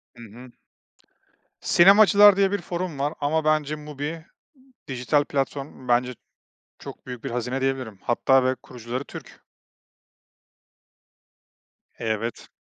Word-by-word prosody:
Hı 120 - -12
hı. 120 +3 -13 1.1
Sinemacılar 205 +2 +6
diye 195 -1 +2
bir 205 -2 -2
forum 175 -3 -5
var 145 +2 -1
ama 155 +2 0
bence 155 -1 +1
MUBI, 150 +2 -7 0.6
dijital 130 +3 0
platform. 135 -1 -4
Bence 125 +1 +1 0.6
çok - - -11
büyük 125 -2 -8
bir - - -5
hazine 125 +2 -3
diyebilirim 130 -6 -3
hatta 130 +2 +2
ve 130 +1 +1
kurucuları 125 +1 -7
Türk. - - -12 2.6
Evet. 115 0 -3
135 Hz, 110 wpm, -24 LUFS, 125-155 Hz, 2.6 s, Sinemacılar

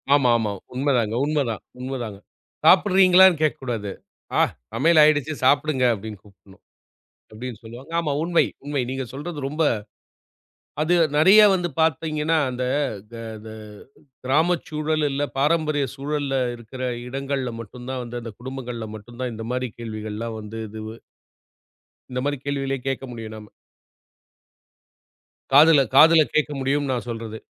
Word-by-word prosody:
ஆமா 135 -4 +3
ஆமா 110 -2 -1 0.2
உண்மைதாங்க, 125 -5 +1
உண்மைதான், 140 -8 -1 0.2
உண்மைதாங்க. 125 -6 -5 0.5
சாப்பிடுறீங்களான்னு 185 -3 +6
கேக்கக் 155 -1 0
கூடாது. 110 -5 -3 0.5
ஆ, - - +6 0.3
சமையல் 155 +7 +4
ஆயிடுச்சு 155 0 +3
சாப்பிடுங்க 145 0 +3
அப்டின்னு 105 -1 -7
கூப்புடணும், 95 -1 -20 0.7
அப்டின்னு 110 0 -8
சொல்லுவாங்க. 120 +8 -11
ஆமா. 155 -4 -2
உண்மை 170 0 +3 0.2
உண்மை 145 -2 -1
நீங்க 135 0 -3
சொல்றது. 150 +4 -6
ரொம்ப 155 +3 0 1.2
அது 160 +3 +2 0.2
நெறைய 190 +7 +7
வந்து 175 -1 -2
பாத்தீங்கன்னா, 160 0 +1
அந்த 125 0 -3 0.5
த, - - -7 0.3
த, - - -8
த, 110 +5 -13 0.2
கிராமச் 160 +6 +2
சூழல் 155 0 -1
இல்ல 140 +1 -1
பாரம்பரிய 150 0 +1
சூழல்ல 140 -1 -2 0.2
இருக்கிற 120 +2 -10 0.3
இடங்கள்ல 135 -1 -3
மட்டும்தான் 125 +4 -7
வந்து, 120 0 -6
அந்த 115 -1 -7
குடும்பங்கள்ல 125 -3 -6
மட்டும்தான் 120 +3 -6
இந்த 110 0 -6
மாரி 125 0 -2
கேள்விகள் 110 -2 -6
எல்லாம் 115 0 -4
வந்து 105 +1 -8
இதுவு 110 +1 -8 1.2
இந்த 125 - -2
மாரி 145 0 -1
கேள்விகளே 135 -1 -2
கேட்க 135 0 -2
முடியும் 115 -2 -7
நாம. 105 -1 -11 2.1
காதுல 150 +1 +7
காதுல 160 +2 +8
கேக்க 155 -1 +2
முடியும்னு 135 +1 0
நான் 120 -1 -4
சொல்றது. 115 -1 -5
135 Hz, 130 wpm, -23 LUFS, 115-150 Hz, 2.1 s, காதுல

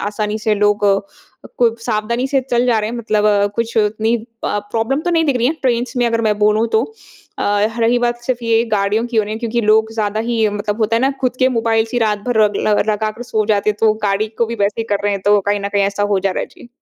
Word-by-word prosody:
आसानी 210 0 -3
से 215 0 0
लोग 205 0 +1 0.7
को 230 -2 +3
सावधानी 235 +2 -1
से 270 -1 +2
चल 240 +1 +2
जा 235 -3 +3
रहे 215 0 -2
हैं 240 - -5
मतलब 215 -2 0 0.3
कुछ 230 0 -2
उतनी 220 +2 +1 0.3
अ, 205 - 0
प्रॉब्लम 230 +5 0
तो 350 - -1
नहीं 325 -1 +2
दिख 280 -4 +1
रही 240 0 +1
है 295 - +2
ट्रेन्स 245 0 0
में 245 -1 +2
अगर 230 0 0
मैं 210 -1 0
बोलूँ 210 +2 +3
तो 220 +1 +3 0.6
अ, 205 +1 +1
रही 235 +2 +3
बात 240 0 -1
सिर्फ 245 -1 -2
ये 230 0 +2
गाड़ियों 205 +4 0
की 240 -2 -5
हो 215 - +4
रही 210 - -5
है 220 - -4
क्योंकि 235 0 -1
लोग 220 +1 +2
ज़्यादा 215 -1 -1
ही 225 -2 +2
मतलब 205 +1 -3
होता 220 +1 +2
है - - +1
ना 270 - +3
खुद 255 -1 -1
के 255 - +5
मोबाइल्स 225 0 0
ही 245 - +1
रात 210 -2 +1
भर 230 -3 +3
रग 205 -1 0
ल 210 - +3
लगा 215 0 -1
कर 235 +3 -9
सो 220 -3 -1
जाते 210 -1 +2
हैं 205 - -5
तो 220 -1 +4
गाड़ी 200 +2 0
को 235 - +2
भी 235 - -4
वैसे 210 +3 -1
ही - - -2
कर 200 - -3
रहे 205 - +1
हैं 195 - -3
तो 205 0 +5
कहीं 205 0 0
न 200 - -3
कहीं 200 -1 +2
ऐसा 200 +1 -1
हो 195 - +2
जा 195 0 0
रहा - - -2
है, - - -3
जी। 240 - -16
220 Hz, 270 wpm, -17 LUFS, 210-235 Hz, 0.7 s, के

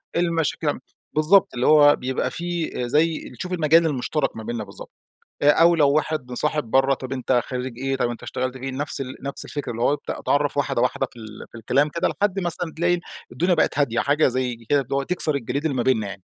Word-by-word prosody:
المشاكل. 170 -4 0 0.4
بالضبط 160 +5 +4
اللي 125 +1 0
هو 145 -1 +7
بيبقى 130 +1 -2
في 175 -1 -3 0.2
زي 160 +3 +1
تشوف 180 0 -4
المجال 165 0 +4
المشترك 150 +1 -1
ما 110 - -7
بيننا 115 -1 -4
بالضبط. - - -11 0.5
آآ 145 - +5
أو 170 +2 +5
لو 145 -3 +4
واحد 155 -4 -1
مصاحب 150 +4 0
برّه 135 +1 +4
طيب 130 -1 -6
أنت 125 -1 +1
خريج 125 -1 -5
إيه، 135 0 -1
طب 120 -2 0
أنت 120 - -7
اشتغلت 130 +1 -3
فين، 130 0 -5
نفس 145 -1 -3
ال 130 -1 -6
نفس 140 0 -5
الفكرة 145 -4 -5
اللي 115 0 -5
هو 140 - +3
ابدأ 145 - -5
أتعرف 145 0 0
واحدة 135 -4 0
واحدة 130 +1 +1
في 120 - -14
ال 110 -1 -10
في 120 - -11
الكلام 140 +6 +1
كده 170 +4 0
لحد 200 -1 -1
مثلًا 175 -2 -3
تلاقي 175 +1 +2 0.3
الدنيا 175 +9 +1
بقت 150 - +1
هادية 120 -4 +1
حاجة، 145 +5 +3
زي 130 -1 -1
كده 145 -1 +4
اللي 135 +2 -4
هو 140 - 0
تكسر 155 -3 0
الجليد 140 +3 -3
اللي 140 -4 0
ما 120 - +1
بيننا 110 -6 +1
يعني. 95 -1 -9
140 Hz, 215 wpm, -23 LUFS, 125-160 Hz, 0.5 s, هو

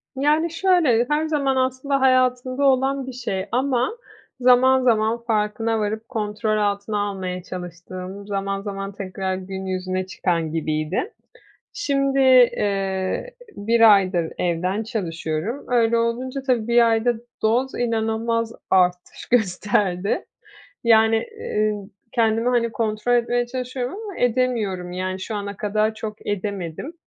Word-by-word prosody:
Yani, 305 +4 +2
şöyle, 330 -10 +3
her 300 +1 +1
zaman 280 -4 +1
aslında 260 +2 0
hayatımda 255 +1 +2
olan 270 0 +2
bir 260 - -6
şey 205 -6 -3
ama 260 - 0 0.4
zaman 255 +1 +5
zaman 230 0 +2
farkına 225 0 0
varıp 220 +2 -3
kontrol 215 0 -1
altına 205 0 -1
almaya 185 -2 -5
çalıştığım, 185 +2 -8
zaman 195 0 -2
zaman 195 -1 -5
tekrar 190 -1 -4
gün 190 0 -6
yüzüne 185 0 -2
çıkan 170 -4 -1
gibiydi. 160 - -2 0.6
Şimdi, 275 -8 0
eee, 205 - +2 0.2
1 225 +1 +5
aydır 185 -4 0
evden 180 +5 -1
çalışıyorum. 175 - -3
Öyle 235 -2 +3
olunca 245 +4 -1
tabii 245 -4 0
1 235 0 +5
ayda 225 +2 +2 0.3
doz 245 +5 +1
inanılmaz 230 0 -1 0.2
artış 180 -1 +1
gösterdi. 200 -3 +1 0.6
Yani, 225 -1 +5 0.2
eee, 215 - 0
ın 205 -2 -7 0.2
kendimi, 230 +1 +2
hani, 235 -2 +1
kontrol 220 +2 -1
etmeye 240 0 +1
çalışıyorum 250 0 -4
ama 405 -4 -8
edemiyorum. 225 -7 0
Yani, 185 +1 -3
şu 215 +3 -5
ana 200 -1 -5
kadar 215 +1 0
çok 215 -1 -7
edemedim. 200 - -4
220 Hz, 125 wpm, -22 LUFS, 195-250 Hz, 0.6 s, zaman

